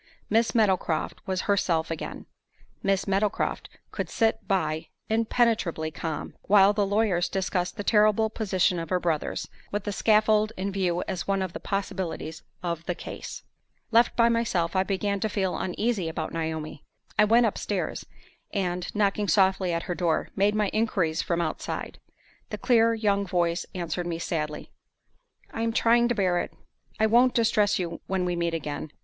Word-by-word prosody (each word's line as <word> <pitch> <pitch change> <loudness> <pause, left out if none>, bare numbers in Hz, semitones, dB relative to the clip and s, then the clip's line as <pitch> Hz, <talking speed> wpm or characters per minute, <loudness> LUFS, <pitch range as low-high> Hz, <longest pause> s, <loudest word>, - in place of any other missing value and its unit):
Miss 225 +3 +2
Meadowcroft 190 -7 +1
was 185 -1 0
herself 175 -5 +1
again. 165 - -5 0.6
Miss 195 -1 +1
Meadowcroft 200 +2 0 0.2
could - - -4
sit 225 -1 +1
by, 165 -5 0 0.2
impenetrably 220 -8 +1
calm, 155 -1 -5
while 200 0 +6
the 205 -1 +1
lawyers 200 -4 +1
discussed 185 -1 -1
the 205 - -3
terrible 215 +1 +4
position 190 -5 +1
of 165 -1 -5
her 185 - +1
brothers, 165 -4 -1 0.2
with 205 -1 -2
the 205 - -3
scaffold 215 +1 +3
in 195 +2 -2
view 180 -3 0
as 180 -2 -3
one 195 -1 +1
of 185 -2 -5
the - - -5
possibilities 190 -5 -3 0.2
of 170 -2 -2
the 180 - -1
"case." - - -8 0.5
Left 235 +1 +4
by 235 -1 +5
myself, 225 -8 0
I 185 - +4
began 200 +1 -1
to 220 - -1
feel 190 -3 -1
uneasy 190 -1 -1
about 160 -1 -4
Naomi. 160 -2 -4 0.4
I 210 - +7
went 230 +3 +5
upstairs, 215 - -2 0.5
and, 180 -3 -2
knocking 205 0 +1
softly 190 -2 +3
at 170 0 -1
her 180 - -3
door, 170 -2 0
made 205 +2 +2
my 210 -2 +1
inquiries 185 -8 +1
from 170 -1 -1
outside. - - -4 0.5
The - - -4
clear 230 -2 +3
young 205 -2 +1
voice 175 -1 0
answered 175 0 -3
me 170 -1 -2
sadly, 155 -3 -3 0.8
"I 225 - -3
am 230 0 +1
trying 235 +1 +4
to 240 - 0
bear 185 -4 +2
it: - - -3 0.5
I 220 - +4
won't 240 +3 +4
distress 220 -3 +3
you 170 -2 -4
when 190 -1 0
we 175 -1 -1
meet 170 -1 -1
again." 150 -1 -5
190 Hz, 165 wpm, -26 LUFS, 170-215 Hz, 0.8 s, I